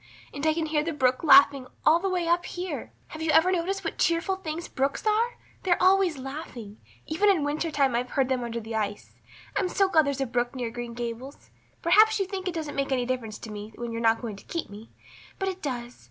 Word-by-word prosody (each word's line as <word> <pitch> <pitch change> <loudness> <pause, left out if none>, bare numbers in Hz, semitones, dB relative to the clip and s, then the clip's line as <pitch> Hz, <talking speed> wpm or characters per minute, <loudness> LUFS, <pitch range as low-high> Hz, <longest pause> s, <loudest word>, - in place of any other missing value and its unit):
And 285 - -6
I 310 - +3
can 325 -1 -1
hear 305 -1 +1
the 330 +1 -2
brook 255 -2 +1
laughing 275 -3 +6 0.2
all 320 +2 +6
the 385 +2 -1
way 360 -2 -1
up 345 +1 +2
here. 360 +1 -5 0.2
Have 315 - -8
you 320 - -1
ever 320 +4 +5
noticed 375 +2 -1
what 330 - -4
cheerful 340 +3 +1
things 335 -2 -5
brooks 275 +8 -2
are? 450 +3 +1 0.2
They're 355 -2 +2
always 370 -3 +4
laughing. 260 -6 -8 0.3
Even 390 +7 +2
in 360 -7 +3
winter 300 +3 -1
time 275 -4 +2
I've 245 +1 -1
heard 270 0 +1
them 255 -2 -1
under 235 0 -3
the 225 0 -7
ice. 205 -2 -3 0.4
I'm 370 - +1
so 390 +1 +2
glad 315 -5 +4
there's 280 -1 -1
a 270 - +1
brook 245 +1 -1
near 245 -3 -3
Green 240 0 -6
Gables. 240 +3 -7 0.3
Perhaps 430 +6 +6
you 390 - +1
think 380 0 -5
it 355 - -2
doesn't 310 -3 -4
make 275 0 -1
any 250 -2 +1
difference 240 -4 -3
to 220 - -9
me 210 +1 -8
when 240 -1 -5
you're 230 0 -4
not 225 +1 +2
going 215 -4 -5
to - - -14
keep 335 -10 -4
me, 210 +3 -11 0.5
but 385 - -2
it 380 0 -4
does. 245 -3 -5
290 Hz, 235 wpm, -27 LUFS, 240-350 Hz, 0.5 s, laughing